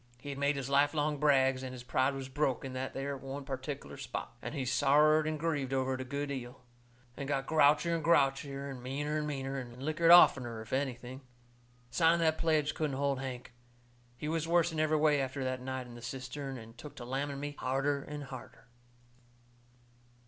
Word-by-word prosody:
He 145 Hz, -, -8 dB
had 140 Hz, -1 st, -5 dB
made 140 Hz, +1 st, +2 dB
his 135 Hz, -1 st, -3 dB
life 140 Hz, +2 st, +3 dB
long 150 Hz, -1 st, 0 dB
brags, 135 Hz, -3 st, +3 dB
and 130 Hz, -1 st, -6 dB
his 125 Hz, -1 st, -8 dB
pride 130 Hz, +2 st, +1 dB
was 135 Hz, -1 st, -5 dB
broke 135 Hz, -1 st, -1 dB
in 130 Hz, -, -6 dB
that 130 Hz, +1 st, -4 dB
there 140 Hz, +1 st, -3 dB
one 135 Hz, +1 st, -7 dB
pertic'ler 135 Hz, +1 st, -5 dB
spot. 125 Hz, -2 st, -6 dB
And -, -, -5 dB
he 135 Hz, -3 st, -2 dB
sorrered 150 Hz, +4 st, +4 dB
and 155 Hz, -1 st, -2 dB
grieved 145 Hz, -5 st, -1 dB
over 130 Hz, 0 st, +1 dB
it 130 Hz, -, -3 dB
a -, -, -2 dB
good 140 Hz, +2 st, -3 dB
'eal, 125 Hz, -1 st, -6 dB, 0.5 s
and 140 Hz, -, -5 dB
got 135 Hz, -1 st, -1 dB
grouchier 155 Hz, +2 st, +4 dB
and 165 Hz, -2 st, -1 dB
grouchier 140 Hz, -3 st, +2 dB
and 130 Hz, -2 st, -8 dB
meaner 145 Hz, +4 st, -2 dB
and 150 Hz, -, -2 dB
meaner, 135 Hz, -2 st, -3 dB
and 120 Hz, -2 st, -9 dB
lickered 155 Hz, +3 st, +2 dB
oftener, 125 Hz, -9 st, +7 dB
if 110 Hz, -, -10 dB
anything. 130 Hz, -1 st, -3 dB, 0.7 s
Signing 165 Hz, +4 st, +4 dB
the 160 Hz, -, +5 dB
pledge 155 Hz, -2 st, +1 dB
couldn't 150 Hz, -4 st, -2 dB
hold 140 Hz, -1 st, 0 dB
Hank. 125 Hz, -2 st, -6 dB, 0.6 s
He 150 Hz, -, -5 dB
was 160 Hz, 0 st, -1 dB
worse 170 Hz, 0 st, +3 dB
in 160 Hz, -, -3 dB
every 155 Hz, 0 st, +3 dB
way 150 Hz, -2 st, +3 dB
after 135 Hz, +1 st, -3 dB
that 130 Hz, 0 st, -2 dB
night 130 Hz, 0 st, -4 dB
in 120 Hz, -, -11 dB
the 120 Hz, -, -10 dB
cistern, 135 Hz, +2 st, -5 dB
and 115 Hz, -1 st, -11 dB
took 145 Hz, +5 st, -10 dB
to 120 Hz, -, -8 dB
lamming 140 Hz, +2 st, -3 dB
me 145 Hz, 0 st, -5 dB
harder 140 Hz, +2 st, 0 dB
and 150 Hz, +1 st, -7 dB
harder. 130 Hz, -2 st, -10 dB
140 Hz, 200 wpm, -32 LUFS, 130-150 Hz, 0.7 s, oftener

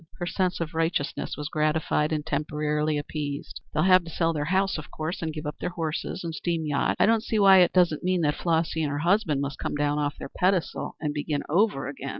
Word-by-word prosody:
Her 175 Hz, -, -3 dB
sense 185 Hz, 0 st, -1 dB
of 165 Hz, -1 st, -3 dB
righteousness 160 Hz, -3 st, -1 dB
was 150 Hz, -1 st, -4 dB
gratified 155 Hz, 0 st, 0 dB
and 150 Hz, -1 st, -1 dB
temporarily 150 Hz, 0 st, -1 dB
appeased. 145 Hz, -1 st, -5 dB
"They'll 155 Hz, -, +1 dB
have 185 Hz, -1 st, +6 dB
to -, -, -8 dB
sell 165 Hz, 0 st, 0 dB
their 150 Hz, -2 st, -2 dB
house, 190 Hz, +1 st, +1 dB
of 155 Hz, -, -10 dB
course, 160 Hz, +3 st, -4 dB
and 160 Hz, -1 st, -2 dB
give 155 Hz, 0 st, -7 dB
up 150 Hz, -, -5 dB
their -, -, -2 dB
horses 165 Hz, +1 st, -4 dB
and 165 Hz, -1 st, -4 dB
steam 165 Hz, -1 st, -2 dB
yacht? 145 Hz, -2 st, 0 dB
I -, -, +6 dB
don't 225 Hz, 0 st, +3 dB
see 225 Hz, -, -1 dB
why 195 Hz, -2 st, +7 dB
it 175 Hz, -1 st, +5 dB
doesn't 175 Hz, -4 st, +3 dB
mean 180 Hz, -1 st, +1 dB
that 150 Hz, -2 st, +2 dB
Flossy 165 Hz, -1 st, 0 dB
and 150 Hz, -, 0 dB
her 145 Hz, -, -2 dB
husband 170 Hz, -3 st, +2 dB
must 140 Hz, -2 st, -4 dB
come -, -, -3 dB
down 145 Hz, 0 st, 0 dB
off 145 Hz, 0 st, -1 dB
their -, -, -7 dB
pedestal 185 Hz, -2 st, 0 dB
and 150 Hz, -2 st, -2 dB
begin 145 Hz, 0 st, -2 dB
over 175 Hz, -3 st, +2 dB
again? 140 Hz, -1 st, -6 dB
160 Hz, 230 wpm, -26 LUFS, 150-175 Hz, -, why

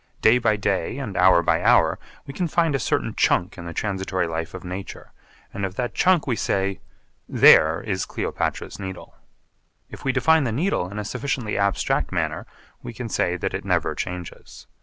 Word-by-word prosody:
Day 120 Hz, +3 st, +6 dB
by 115 Hz, -3 st, +2 dB
day 100 Hz, +1 st, -1 dB
and 115 Hz, -9 st, -5 dB
hour 90 Hz, -1 st, +5 dB
by -, -, +2 dB
hour -, -, +4 dB, 0.3 s
we 140 Hz, -, -8 dB
can 180 Hz, +2 st, -1 dB
find 165 Hz, -1 st, +1 dB
a 135 Hz, -, 0 dB
certain -, -, -1 dB
chunk 90 Hz, -, +1 dB
in 85 Hz, -, -9 dB
the -, -, -5 dB
transitory 95 Hz, 0 st, -2 dB
life 80 Hz, +1 st, -4 dB
of 95 Hz, -, -8 dB
nature 90 Hz, +2 st, -8 dB, 0.4 s
and 100 Hz, -, -5 dB
of 95 Hz, -1 st, -3 dB
that 120 Hz, +2 st, -3 dB
chunk 185 Hz, -4 st, +3 dB
we 125 Hz, -, 0 dB
say, 95 Hz, -2 st, -1 dB, 0.5 s
'There 80 Hz, +1 st, +6 dB
is 100 Hz, -5 st, -3 dB
Cleopatra's -, -, -3 dB
Needle.' 95 Hz, -2 st, -8 dB, 0.8 s
If -, -, -10 dB
we 135 Hz, -, +1 dB
define 160 Hz, +4 st, +3 dB
the 120 Hz, -, -1 dB
Needle 125 Hz, -, -1 dB
in 100 Hz, -, -8 dB
a 105 Hz, -, -4 dB
sufficiently 125 Hz, -1 st, -3 dB
abstract 100 Hz, -1 st, 0 dB
manner -, -, -2 dB, 0.3 s
we 120 Hz, -, -8 dB
can 115 Hz, 0 st, -6 dB
say 90 Hz, -3 st, 0 dB
that -, -, -3 dB
it -, -, -4 dB
never -, -, 0 dB
changes. 90 Hz, -1 st, -7 dB
100 Hz, 185 wpm, -23 LUFS, 90-125 Hz, 0.8 s, Day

